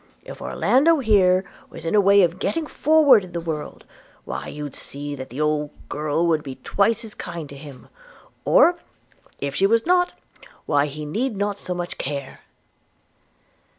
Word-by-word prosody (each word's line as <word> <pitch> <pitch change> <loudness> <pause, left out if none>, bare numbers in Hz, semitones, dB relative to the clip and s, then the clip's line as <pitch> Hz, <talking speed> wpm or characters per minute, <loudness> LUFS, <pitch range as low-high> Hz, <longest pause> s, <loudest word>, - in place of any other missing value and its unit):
If - - -10
Orlando 315 +6 +3
here 195 -7 +3 0.2
was - - -10
in 165 - -1
a 210 - +5
way 200 0 +6
of 175 +1 0
getting 330 +9 -1
forward 295 -8 +4
in 180 - -11
the 170 - -2
world, 160 -3 -6 0.4
why - - -5
you'd 145 -2 -7
see 145 +1 -7
that 130 -2 -7
the 125 +5 -8
old 150 -1 0 0.2
girl 150 +3 -1
would 160 -2 +2
be 135 -3 -7
twice 225 - 0
as 215 - -9
kind 170 -3 -7
to 140 - -10
him 140 -2 -12 0.3
– - - -24 0.2
or, 355 -9 +5 0.6
if 140 -1 -3
she 195 - +3
was 230 +2 +2
not, 355 +1 +2 0.5
why 145 -1 +2
he 150 +1 -7
need 220 - -2
not 205 0 -2
so 180 - -4
much 175 0 -5
care.' 140 -1 -5
175 Hz, 175 wpm, -23 LUFS, 150-225 Hz, 0.6 s, way